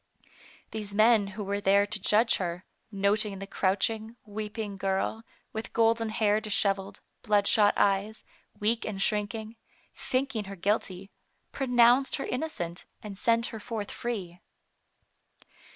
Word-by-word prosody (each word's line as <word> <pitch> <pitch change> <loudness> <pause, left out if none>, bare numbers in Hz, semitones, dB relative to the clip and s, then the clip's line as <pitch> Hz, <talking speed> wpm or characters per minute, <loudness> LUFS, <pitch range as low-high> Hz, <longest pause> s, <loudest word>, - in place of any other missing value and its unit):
These 210 -2 -5
men 215 -1 +5
who 210 - -3
were 200 +1 -2
there 200 +1 +4
to 210 0 -3
judge 225 +4 +3
her, 180 0 -4 0.3
noting 200 0 +1
the 195 - -6
crouching, 220 +4 -1
weeping 210 0 -5
girl, 195 +3 -1 0.3
with 220 +1 -6
golden 225 0 +2
hair 215 -1 +2
disheveled, 200 -2 0 0.2
bloodshot 205 -1 +3
eyes, 200 +2 +1 0.4
weak 225 +2 0
and 205 -2 -4
shrinking, 215 +2 -2 0.4
thinking 255 -5 -2
her 195 0 -7
%\}}\\.y^ 195 0 -1 0.4
pronounced 250 0 +4
her 275 - -3
innocent, 245 - -4 0.2
and 210 -2 -7
sent 230 +3 +2
her 225 - -5
forth 210 -1 -5
free. 190 -8 -5
210 Hz, 125 wpm, -28 LUFS, 200-225 Hz, 0.4 s, men